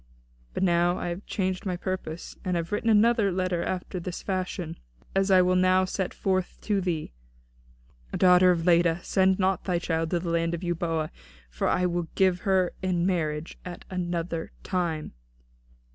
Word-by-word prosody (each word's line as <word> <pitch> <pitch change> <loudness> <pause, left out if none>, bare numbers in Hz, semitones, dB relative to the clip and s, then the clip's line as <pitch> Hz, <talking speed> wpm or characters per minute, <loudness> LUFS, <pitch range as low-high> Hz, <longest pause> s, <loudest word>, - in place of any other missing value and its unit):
But - - 0
now 175 0 +3
I 175 - -3
have 175 +4 -6
changed 185 -2 -1
my 185 -3 -2
purpose, 180 -3 -5
and 180 -2 0
have 170 0 -3
written 210 +2 0
another 220 -1 +4
letter 185 -1 0
after 185 0 -3
this 180 0 -6
fashion, 185 -3 -3 0.4
as 195 +1 +2
I 185 -1 +6
will 180 0 +2
now 185 0 +4
set 185 0 -2
forth 185 -2 -1
to 205 -2 0
thee: 165 - -2 1.0
'DAUGHTER 180 0 +6
OF 170 -2 +2
LEDA, 170 -1 +4
SEND 190 0 +3
NOT 190 -1 +1
THY 180 -3 +1
CHILD 165 -2 -1
TO 175 - +1
THE 170 0 -4
LAND 165 0 +1
OF 170 - -7
EUBOEA, 165 -2 -1 0.4
FOR - - -1
I 180 - +2
WILL 175 -1 -1
GIVE 185 -2 +3
HER 185 -1 +1
IN 180 -2 0
MARRIAGE 160 -4 -1
AT 180 -1 -8
ANOTHER 175 -2 -3
TIME.'" 170 -4 -2
180 Hz, 170 wpm, -27 LUFS, 170-185 Hz, 1.0 s, I